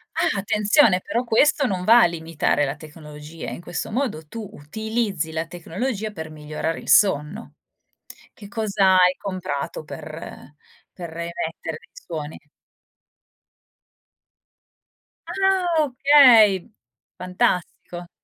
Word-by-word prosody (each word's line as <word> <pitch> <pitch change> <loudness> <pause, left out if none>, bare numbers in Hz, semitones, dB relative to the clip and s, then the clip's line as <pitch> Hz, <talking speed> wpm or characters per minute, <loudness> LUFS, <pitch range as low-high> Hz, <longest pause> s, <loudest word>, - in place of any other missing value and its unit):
Ah, - - 0
attenzione, 210 0 +3
però 235 +2 -2
questo 280 +4 +3
non 185 -5 -2
va 235 +2 +7
a - - +6
limitare 160 -3 -1
la 135 +2 -3
tecnologia. 150 0 -10
In - - -8
questo 175 +4 -5
modo, 210 - -3
tu 220 +3 -7
utilizzi 200 +1 -3
la 160 +1 -3
tecnologia 215 +6 -4
per 160 -5 -8
migliorare 155 +1 -5
il - - -10
sonno. 190 +2 +2 0.8
Che 205 - -13
cosa 200 -3 +2
hai 180 0 +4
comprato 185 -6 -5
per 155 -1 -10 0.4
per 170 -3 -8
emettere 170 -1 -5
dei - - -24
suoni? 160 - -7 2.9
Ah 385 -1 +1 0.2
okay, 245 -8 +5 0.5
fantastico. 180 -1 -2
180 Hz, 110 wpm, -22 LUFS, 160-220 Hz, 2.9 s, va